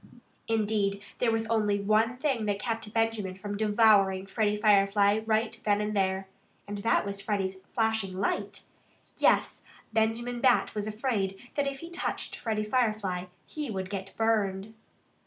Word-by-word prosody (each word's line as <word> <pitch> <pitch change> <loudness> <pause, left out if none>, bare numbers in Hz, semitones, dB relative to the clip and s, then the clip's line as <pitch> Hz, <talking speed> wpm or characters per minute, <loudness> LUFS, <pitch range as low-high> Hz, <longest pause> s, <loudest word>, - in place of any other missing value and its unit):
Indeed, 210 -3 +1 0.2
there 245 - +2
was 225 0 0
only 215 -3 +1
one 215 +4 +2
thing 260 -5 0
that 205 -1 0
kept 225 0 -3
Benjamin 225 -4 0
from 205 +2 -5
devouring 205 -3 +4
Freddie 210 +1 0
Firefly 205 0 +4
right 220 +1 0
then 205 -1 +2
and 210 0 -2
there. 190 -1 0 0.4
And 205 0 -5
that 220 0 +2
was 200 0 -4
Freddie's 195 -2 -2 0.2
flashing 220 -5 0
light. 200 0 -2 0.5
Yes! - - +2 0.3
Benjamin 230 +2 0
Bat 250 -1 +3
was 210 0 -3
afraid 215 -4 -1 0.2
that 285 -1 0
if 275 -1 -4
he 335 +1 -9
touched 345 - -3
Freddie 215 -2 -2
Firefly 215 -6 0 0.2
he 300 -3 -5
would 190 -2 -4
get 195 -1 -5
burned. 215 -2 0
210 Hz, 150 wpm, -29 LUFS, 200-225 Hz, 0.5 s, devouring